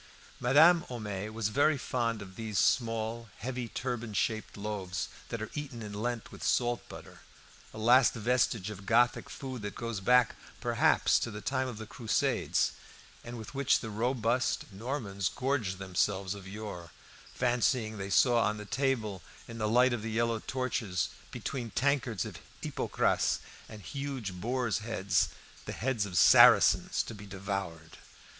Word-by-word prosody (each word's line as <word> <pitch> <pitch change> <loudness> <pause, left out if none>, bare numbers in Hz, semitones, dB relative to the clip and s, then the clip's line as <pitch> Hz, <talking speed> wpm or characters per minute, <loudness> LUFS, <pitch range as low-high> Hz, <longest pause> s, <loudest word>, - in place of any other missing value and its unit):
Madame 160 +7 +6
Homais 105 -4 -4
was 110 -1 -2
very 145 +5 +3
fond 115 -4 -2
of 95 -1 -13
these 110 -2 -4
small, 115 0 +1
heavy 125 0 -4
turban 120 -1 -4
shaped 110 0 -1
loaves, 100 -3 -4 0.2
that 115 -1 -3
are 110 - -7
eaten 135 -6 -6
in 105 -1 -7
Lent 115 +2 -3
with - - -10
salt 120 -1 +1
butter; - - -11 0.5
a - - -11
last 120 +4 +5
vestige 115 -3 +1
of 100 -1 -10
Gothic 120 +2 +3
food 130 -4 -6
that 105 -1 -5
goes 115 -3 -4
back, 125 +4 +4 0.2
perhaps, - - +3
to - - -2
the 105 -2 -7
time 130 +3 -1
of 120 -4 -6
the 110 - -7
Crusades, 105 +2 0 0.5
and 120 +1 -7
with 110 +3 -9
which 140 -1 +3
the 110 - -6
robust 120 0 0
Normans 100 -4 -3
gorged 125 -8 -1
themselves 95 +1 -1
of 100 -2 -10
yore, 100 -4 -7 0.5
fancying 120 -3 +1
they 95 0 -4
saw 120 +3 +4
on 110 -1 +1
the 105 - -7
table, 115 -7 -1 0.3
in 115 0 -8
the 105 -1 0
light 125 +2 +4
of 120 - -2
the 110 - -4
yellow 115 0 0
torches, 120 - -2 0.2
between 125 -4 -4
tankards 130 -6 0
of - - -8 0.2
hippocras - - +1 0.3
and 105 -2 -10
huge 135 -7 -4
boars' 120 +5 -1
heads, 105 -4 0 0.4
the - - -5
heads 120 -4 -1
of 90 -4 -4
Saracens - - +7
to - - -8
be 105 -1 -10
devoured. 95 -4 -5
115 Hz, 155 wpm, -31 LUFS, 105-125 Hz, 0.5 s, Saracens